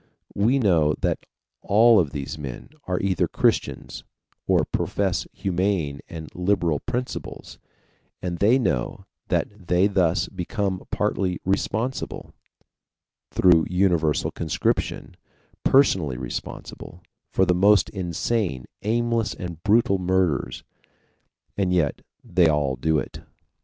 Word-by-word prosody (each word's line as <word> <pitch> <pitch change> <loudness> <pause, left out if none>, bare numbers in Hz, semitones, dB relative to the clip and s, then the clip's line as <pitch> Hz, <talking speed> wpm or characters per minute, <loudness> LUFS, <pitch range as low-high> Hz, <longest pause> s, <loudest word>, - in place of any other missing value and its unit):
We 115 +7 +2
know 85 - +3
that - - -1 0.3
all 110 +2 +5
of 80 -5 +1
these 70 +3 -5
men 70 -5 -7 0.2
are 90 -1 -1
either 95 -2 +1
Christians, - - -1 0.4
or - - +3
profess - - -1
humane 90 -6 -1
and 80 -2 -7
liberal 90 -4 +1
principles, 125 +1 -5 0.6
and 85 -2 -4
they 110 +6 +5
know 65 - -1 0.2
that 100 -4 -2
they 90 +2 +3
thus 95 -3 +2
become 95 0 -3
partly 95 -3 -1
responsible 110 +6 -2 1.0
through 85 -3 +4
universal 90 -4 +1
conscription, 80 -3 -2 0.5
personally 90 - +3
responsible 65 +6 -7 0.3
for 95 - +2
the 90 - +3
most 100 +3 +4
insane, 90 - -2 0.2
aimless, 115 +1 0
and 85 -2 -7
brutal 105 -1 +3
murders. 90 -6 0 0.9
And 95 -2 0
yet 80 -6 +1 0.2
they 85 -1 +3
all 75 -4 +1
do 80 +5 +1
it. 65 - -4
90 Hz, 110 wpm, -24 LUFS, 80-100 Hz, 1.0 s, all